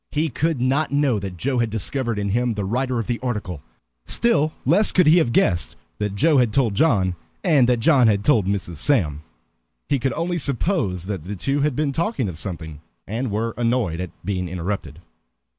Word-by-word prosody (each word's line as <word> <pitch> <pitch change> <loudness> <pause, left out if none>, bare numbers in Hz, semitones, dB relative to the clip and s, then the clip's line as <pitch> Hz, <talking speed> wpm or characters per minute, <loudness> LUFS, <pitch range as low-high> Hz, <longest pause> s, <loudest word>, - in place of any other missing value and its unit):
He 155 +2 0
could 155 +2 -1
not 135 +5 +1
know 140 -6 +2
that 95 -2 -6
Joe 130 +6 -1
had 115 -1 +1
discovered 115 +2 -2
in 100 -1 -1
him 120 +2 0
the 100 -1 -2
writer 125 +4 -1
of 115 - -2
the 120 -1 -2
article, 105 - -4 0.4
still 155 -10 +2
less 195 +10 +4
could 180 - +4
he 160 +4 +6
have 125 -8 +1
guessed 90 -6 +1 0.2
that 105 -1 -2
Joe 150 +5 +4
had 120 -3 +2
told 115 -3 +2
John, 95 - +2 0.3
and 145 -9 +4
that 120 -2 +2
John 130 -3 +5
had 100 -2 +2
told 110 -6 +3
Mrs. 95 -4 -2
Sam. 80 - +1 0.7
He 140 - +2
could 130 +2 -1
only 170 +2 -2
suppose 130 - -1
that 95 -5 -5
the 100 +3 -5
two 135 +9 -1
had 145 -2 +1
been 150 0 0
talking 165 - -1
of 85 -4 -6
something, 80 -5 -7 0.2
and 115 +5 -3
were 110 +2 -2
annoyed 115 -8 0
at 90 -1 -4 0.2
being 90 -3 -2
interrupted. 90 -3 -4
120 Hz, 195 wpm, -22 LUFS, 100-140 Hz, 0.7 s, he